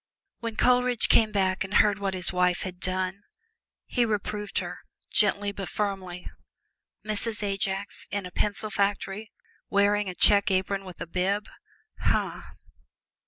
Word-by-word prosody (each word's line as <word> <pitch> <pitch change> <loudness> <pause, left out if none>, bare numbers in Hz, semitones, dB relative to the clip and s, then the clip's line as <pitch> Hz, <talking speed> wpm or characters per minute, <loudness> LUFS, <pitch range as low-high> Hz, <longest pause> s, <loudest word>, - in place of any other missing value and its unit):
When 230 -2 -4
Coleridge 250 -1 +3
came 220 -1 +5
back 190 -1 +1
and 195 +1 -5
heard 205 -1 +4
what 195 -1 -2
his 185 +1 +1
wife 180 0 +2
had 185 -2 -6
done, 185 +1 -2 0.6
he 245 - +1
reproved 210 -2 -2
her - - -3 0.3
gently 205 -1 +3
but 195 -2 -6
firmly. 190 -4 -3 0.8
Mrs. 215 0 +2
Ajax 195 0 -2
in 200 -1 -3
a 180 - -8
pencil 210 +3 -1
factory 200 +1 -1 0.4
wearing 200 0 +2
a 180 - -6
check 200 +2 +5
apron 195 +1 0
with 185 -2 -11
a - - -2
bib! 190 +4 -1 0.5
huh!! - - 0
200 Hz, 140 wpm, -27 LUFS, 185-210 Hz, 0.8 s, came